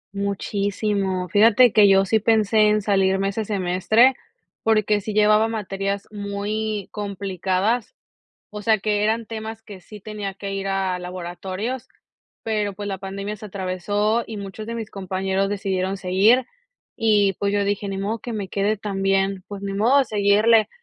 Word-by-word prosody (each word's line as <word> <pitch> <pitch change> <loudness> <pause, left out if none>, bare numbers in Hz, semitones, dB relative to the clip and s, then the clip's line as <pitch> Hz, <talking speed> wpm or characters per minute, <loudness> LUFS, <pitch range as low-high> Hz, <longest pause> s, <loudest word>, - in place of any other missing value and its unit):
Muchísimo. 200 -1 -1
Fíjate 220 +5 +5
que 210 -2 +7
yo 195 0 +5
sí 220 +3 +2
pensé 215 -1 +3
en 210 -1 +1
salirme 195 -1 +2
ese 215 +2 -3
semestre, 205 +6 +3 0.5
porque 215 -2 +2
sí 215 +2 -5
llevaba 215 +1 +4
materias 200 -2 -3
muy 205 0 -3
complicadas. 200 +2 -2 0.6
O 210 0 -7
sea, 220 0 +3
que 210 0 0
eran 225 +1 0
temas 220 0 -6
que 200 -3 -11
sí 210 +3 -12
tenía 205 -2 -6
que 195 0 -6
ir 195 0 -3
a 190 -2 -1
laboratorios, 185 +8 -5 0.6
pero, 210 -3 -1
pues, 205 +1 -6
la 195 -2 -3
pandemia 200 +2 -5
se 215 +1 -9
atravesó, 205 +3 -1
y 220 - -8
muchos 200 +2 -7
de 230 - -4
mis 225 -2 -5
compañeros 190 0 -2
decidieron 195 -1 -2
seguir. 200 +7 +3 0.5
Y, 210 -3 +3
pues, 200 0 0
yo 205 0 +1
dije: 200 0 -2
"Ni 195 0 -4
modo 210 +3 -2
que 240 - -6
me 210 -3 -3
quede 205 +2 0
también, 195 -1 0
pues, 200 -1 -7
ni 200 0 -3
modo, 225 +7 +3
a 280 - +5
seguirle". 215 +1 +3
205 Hz, 160 wpm, -22 LUFS, 195-215 Hz, 0.6 s, que